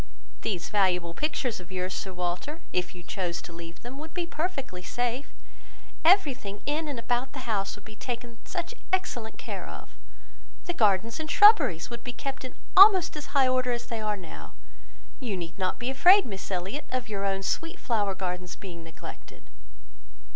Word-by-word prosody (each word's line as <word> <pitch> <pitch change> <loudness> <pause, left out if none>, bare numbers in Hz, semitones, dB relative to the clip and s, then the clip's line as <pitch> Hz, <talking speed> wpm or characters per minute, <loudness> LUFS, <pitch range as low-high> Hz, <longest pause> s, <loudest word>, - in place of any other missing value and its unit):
These 180 -5 -2
valuable 180 -4 +2
pictures 265 - -1
of 180 0 -12
yours, 185 0 -2
Sir 190 - -4
Walter, 180 - -3
if 180 0 -1
you 175 - -10
chose 175 -2 -2
to 170 - -9
leave 170 0 -10
them, 250 +3 -7
would 315 +1 -9
be 350 -1 0
perfectly 300 - -3
safe. 245 +7 -2 0.7
Everything 285 - +3
in 305 +2 0
and 285 -4 -4
about 245 +2 -1
the 265 -2 -6
house 200 -4 -1
would 205 - -16
be 215 - -11
taken 240 -2 -5
such 355 +4 -4 0.2
excellent 240 -12 -1
care - - -6
of! - - -10 0.7
The 350 - -1
gardens 220 - +2
and 310 0 -4
shrubberies 295 - +6
would 235 - -6
be 250 - -5
kept 275 +1 -5
in 255 - -7 0.2
almost 380 -4 +9
as 300 - -6
high 265 -1 +6
order 255 -1 +2
as 240 - -3
they 230 -2 -4
are 210 -1 0
now. 175 -4 -10 0.6
You 230 -8 -2
need 170 +1 -6
not 185 -1 0
be 245 +2 -2
afraid, 365 +9 +7
Miss 195 -4 -6
Elliot, 195 +10 -3
of 255 -1 -2
your 200 -2 -3
own 195 -1 0
sweet 330 - -1
flower 205 -5 0
gardens 180 -1 -4
being 170 -4 -9
neglected." 165 - -11
230 Hz, 180 wpm, -28 LUFS, 185-285 Hz, 0.7 s, almost